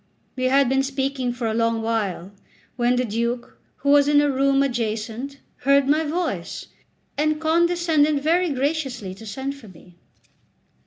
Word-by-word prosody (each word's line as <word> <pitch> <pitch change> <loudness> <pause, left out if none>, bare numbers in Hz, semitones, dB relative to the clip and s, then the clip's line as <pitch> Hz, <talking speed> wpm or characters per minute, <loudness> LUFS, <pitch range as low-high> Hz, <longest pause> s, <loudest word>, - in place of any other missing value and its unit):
We 255 - -2
had 270 +1 +4
been 265 +2 +2
speaking 270 -2 -2
for 240 -1 -5
a 220 - 0
long 230 0 0
while, 200 -5 -2 0.4
when 245 0 +2
the 250 0 +1
Duke, 235 +2 -3 0.2
who 280 - -2
was 285 0 +5
in 290 0 +5
a 290 -1 +2
room 275 +1 +2
adjacent, 235 +1 -3 0.2
heard 275 +1 +3
my 305 +3 +3
voice, 335 +4 -3 0.5
and 305 0 +1
condescended 320 -2 +2
very 340 +5 +2
graciously 270 -8 -2
to 220 +4 -12
send 265 +7 -4
for 280 -6 -14
me. 180 -1 -17
270 Hz, 155 wpm, -23 LUFS, 230-290 Hz, 0.5 s, was